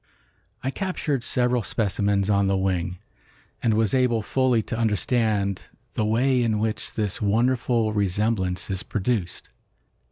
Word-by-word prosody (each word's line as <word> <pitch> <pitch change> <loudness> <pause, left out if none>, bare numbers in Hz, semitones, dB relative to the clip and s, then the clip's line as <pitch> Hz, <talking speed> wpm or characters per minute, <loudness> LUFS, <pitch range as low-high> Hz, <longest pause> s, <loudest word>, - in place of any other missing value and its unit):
I 135 - -1
captured 155 - -2
several 125 0 +1
specimens 100 -2 0
on 100 -1 +2
the 95 0 +2
wing, 90 -2 -1 0.6
and 110 -2 +2
was 110 -2 +1
able 125 -4 +2
fully 125 -1 +2
to - - -4
understand 110 -3 0 0.3
the 110 - 0
way 125 +4 +2
in 110 -2 +1
which 110 0 -3
this 105 -3 -1
wonderful 115 +1 +1
resemblance 100 -1 0
is 95 -1 -2
produced. 100 -3 -2
110 Hz, 130 wpm, -24 LUFS, 100-120 Hz, 0.6 s, on